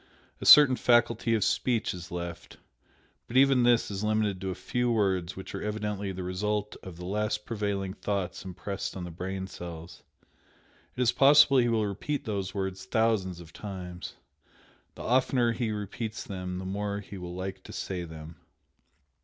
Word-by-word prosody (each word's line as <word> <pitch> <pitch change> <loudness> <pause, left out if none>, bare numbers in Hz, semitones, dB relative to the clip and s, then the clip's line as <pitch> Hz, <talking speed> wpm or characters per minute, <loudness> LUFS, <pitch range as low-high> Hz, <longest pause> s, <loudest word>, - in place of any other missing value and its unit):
A - - -2
certain 140 -4 +9
faculty 120 -1 +3
of 110 - +1
speech 120 -3 +1
is 90 -2 -8
left, 85 -1 -6 0.7
but 120 - -1
even 135 -1 +6
this 120 -3 +3
is 100 +1 -3
limited 105 -3 0
to 95 - -2
a 90 - -3
few 125 0 -1
words 95 -5 +1
which 95 - -8
are - - -4
evidently 105 -2 -3
the 95 0 -5
result 105 +3 -2
of 90 -3 -9
the 90 - -7
last 105 +2 -1
prevailing 100 -4 -2
thoughts 100 -3 -3
impressed 95 +1 -5
on 90 - -5
the 90 - -6
brain 95 +3 -4
cells. 85 -2 -9 1.0
It - - 0
is 120 - +4
possible 140 0 +6
he 120 -1 +3
will 110 -2 +2
repeat 105 +9 -3
those 100 -3 -2
words 95 -1 -3
thousands 110 -6 +1
of 85 0 -13
times! 90 -2 -7 0.8
the - - -8
oftener 125 -1 +2
he 115 0 -2
repeats 105 +1 -4
them 90 -2 -5
the 95 - -5
more 100 +1 -2
he 100 -1 -9
will 90 0 -7
like 95 +1 -5
to - - -9
say 90 -2 -4
them." 80 -1 -9
100 Hz, 170 wpm, -29 LUFS, 90-110 Hz, 1.0 s, certain